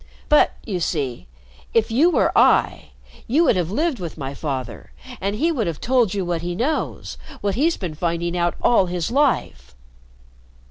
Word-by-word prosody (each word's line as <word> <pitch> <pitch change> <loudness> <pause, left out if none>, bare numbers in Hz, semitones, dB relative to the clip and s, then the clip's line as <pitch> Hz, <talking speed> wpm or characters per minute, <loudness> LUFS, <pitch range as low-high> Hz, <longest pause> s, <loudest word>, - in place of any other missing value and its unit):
But, 300 - +4
you 195 -6 -3
see, 140 - -3 0.5
if 225 -1 +2
you 290 +10 +4
were 350 - +1
I, - - +3 0.4
you 285 +8 +3
would 280 - +3
have 175 -3 -1
lived 295 - -1
with 170 -3 -6
my 135 -2 -5
father, 130 - -5 0.3
and 200 +2 -1
he'd 325 +7 0
have 165 -3 -4
told 240 -6 +1
you 195 -2 -1
what 170 -2 -2
he 175 0 -4
knows 280 - -3 0.2
what 200 -1 0
he's 315 - +1
been 180 -5 -5
finding 170 +2 -2
out 175 -1 0
all 195 -6 +4
his 175 +1 -3
life." 275 - 0
185 Hz, 170 wpm, -21 LUFS, 165-255 Hz, 0.5 s, But